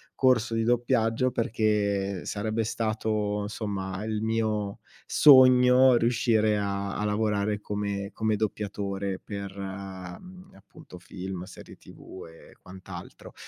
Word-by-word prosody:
corso 120 -3 +2
di 115 - +1
doppiaggio, 120 0 +1
perché 105 -5 -1
sarebbe 110 +2 -2
stato 110 -2 -2
somma 100 -2 -4
il 110 -1 -3
mio 110 -2 -1 0.3
sogno 130 -2 +7
riuscire 115 -2 +2
a 100 -1 -3
a 105 - -2
lavorare 105 -1 0
come 100 -1 -4
come 110 -1 0
doppiatore 100 -2 -3
per, 100 -2 -7
mhmm, 95 - -9
appunto, 95 -1 -15
film, 90 0 -7
serie 95 - -12
tv 95 - -12
e 80 - -17
quant'altro. 90 -1 -11
105 Hz, 110 wpm, -27 LUFS, 100-115 Hz, 0.3 s, sogno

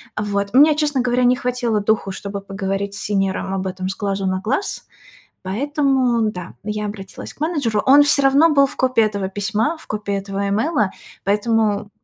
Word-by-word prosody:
Вот, 200 0 -2
мне, 295 +3 +6
честно 295 -3 +1
говоря, 250 0 +1
не 245 +1 +4
хватило 245 -3 -1
духу, 205 -2 0
чтобы 200 +1 -6
поговорить 195 0 -3
с 205 - -3
сеньором 195 -2 -1
об 190 0 -3
этом 185 0 -4
с 195 - -3
глазу 195 -2 -2
на 185 0 0
глаз, 270 - -2 0.6
поэтому, 255 - +1
да, 180 -2 -8
я 210 0 -3
обратилась 195 -2 -8
к - - -31
менеджеру. 285 -10 0
Он 285 +2 +7
всё 290 -1 +4
равно 275 +4 +5
был 280 -2 +5
в - - -7
копии 255 -3 +2
этого 200 -3 -2
письма, 215 - -1
в - - -12
копии 210 -1 -3
этого 195 0 -3
имейла, 215 - +1 0.3
поэтому 210 0 +1
215 Hz, 180 wpm, -20 LUFS, 200-260 Hz, 0.6 s, Он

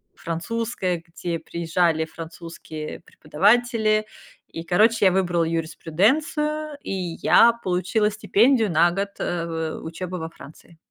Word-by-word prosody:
французское, 185 +1 -3
где 170 0 -4
приезжали 165 -1 0
французские 165 -1 -8
преподаватели, 215 +8 +1 0.4
и 165 - -7
короче, 215 +5 +3
я 190 - +6
выбрала 175 -2 +1
юриспруденцию, 280 - 0
и - - -5 0.3
я 235 0 +6
получила 185 +4 +1
стипендию 220 +2 +3
на 170 +2 +4
год, 195 +3 -2
э, 170 -1 -2
в 160 -1 -4
в - - -11
учебы 180 +2 -5
во 160 0 -5
Франции. 165 +1 -15
180 Hz, 120 wpm, -23 LUFS, 165-220 Hz, 0.4 s, я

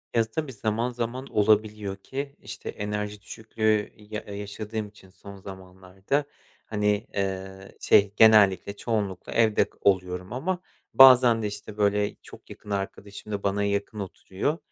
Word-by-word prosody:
Ya 115 - +5
tabii 150 +2 -3
zaman 110 +3 -1
zaman 120 +2 -4
olabiliyor 105 -1 +1
ki, 140 +7 -6
işte - - -7
enerji 105 0 -4
düşüklüğü 110 -1 -1
ya 105 0 -7
yaşadığım 105 +2 -6
için 100 -2 -18
son 100 +1 -12
zamanlarda 95 +6 -4 0.4
hani, 105 0 0
eee, 95 0 -4
şey 100 -1 +4
genellikle, 100 -3 +5
çoğunlukla 100 -6 -3
evde 110 -2 +3
oluyorum 90 -1 0
ama 175 +8 -2 0.3
bazen 125 -3 +8
de - - 0
işte, 105 +1 -7
böyle, 105 0 +1
çok - - -15
yakın 105 - -12
arkadaşım 100 +1 -5
da 100 -1 -3
bana 100 +1 0
yakın 100 +1 -2
oturuyor. 100 - -3
105 Hz, 135 wpm, -26 LUFS, 100-110 Hz, 0.4 s, bazen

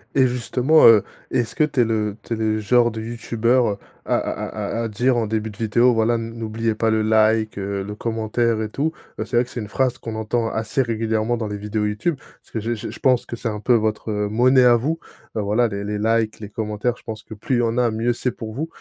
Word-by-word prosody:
et 130 -1 +5
justement, 125 +5 +3
heu, 110 -3 +8 0.3
est-ce 120 -3 -1
que - - +3
tu 145 -3 0
es 120 - +7
le 105 -2 -1
tu 115 - -4
es - - 0
le 110 -1 0
genre 120 +2 +3
de 110 - -6
youtubeur 115 0 0 0.3
à - - 0
à - - +3
à - - -3
à 115 - -1
à - - -1
dire 120 +5 +1
en 115 -2 0
début 110 0 -2
de 105 - -11
vidéo, 120 +3 +3
voilà, 115 +1 +2
n 115 0 -4
n'oubliez 115 0 -2
pas 115 +1 +1
le 110 0 +2
like, 110 0 +3
le 100 +1 -4
commentaire 115 0 0
et 110 - -1
tout? 145 +9 -1 0.3
C'est 120 - -3
vrai 120 - +3
que - - -16
c'est 120 - -5
une 105 - -7
phrase 130 0 0
qu'on 115 -3 -6
entend 110 +1 -1
assez 110 +4 -1
régulièrement 115 0 0
dans 110 -2 -3
les 105 - -4
vidéos 105 +1 -2
YouTube. 110 +10 -1
Parce - - -22
que 110 - -2
je 115 +3 -2
je 110 +1 -6
je - - -9
pense 130 -2 +3
que 120 - -6
c'est 115 - -4
un 105 -1 -3
peu, 125 - +3
heu, - - +6
votre 110 0 -1
monnaie 120 +6 +3
à 120 -1 +7
vous, 155 +8 -1 0.4
voilà, 110 +3 +1
les 100 0 -4
les 105 0 -2
likes, 110 0 +1
les 105 - -7
commentaires. 110 +3 -2
Je - - -20
pense 110 -2 -7
que 110 - -10
plus 115 +5 -2
il - - +2
y - - +3
en 115 0 0
a, 125 -1 +3
mieux 115 +2 0
c'est 125 +1 -1
pour 110 -2 -7
vous. 150 +7 -3
115 Hz, 260 wpm, -22 LUFS, 110-120 Hz, 0.4 s, heu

